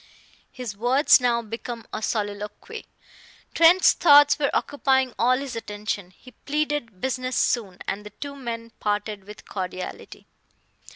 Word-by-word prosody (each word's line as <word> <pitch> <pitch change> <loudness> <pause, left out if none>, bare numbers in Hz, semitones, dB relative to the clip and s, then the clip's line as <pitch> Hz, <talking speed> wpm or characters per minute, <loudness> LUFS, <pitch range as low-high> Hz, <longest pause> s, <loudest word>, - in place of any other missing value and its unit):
His 245 -5 -7
words 255 +6 +4
now 235 -1 +1
became 230 +1 -7
a 215 - -3
soliloquy: 210 - -4 0.7
Trent's 335 +3 +6
thoughts 290 -3 +6
were 280 - +2
occupying 265 -3 +1
all 250 +2 +3
his 270 -2 -6
attention. 210 -3 -5
He 255 +7 -17
pleaded 295 -8 -3
business 255 -1 -2
soon, 200 -7 0
and 200 +2 -3
the 210 - -9
two 280 +7 -8
men 230 -3 -6
parted 205 -1 -2
with 210 +1 -12
cordiality. 185 -1 -6
235 Hz, 130 wpm, -24 LUFS, 210-275 Hz, 0.7 s, Trent's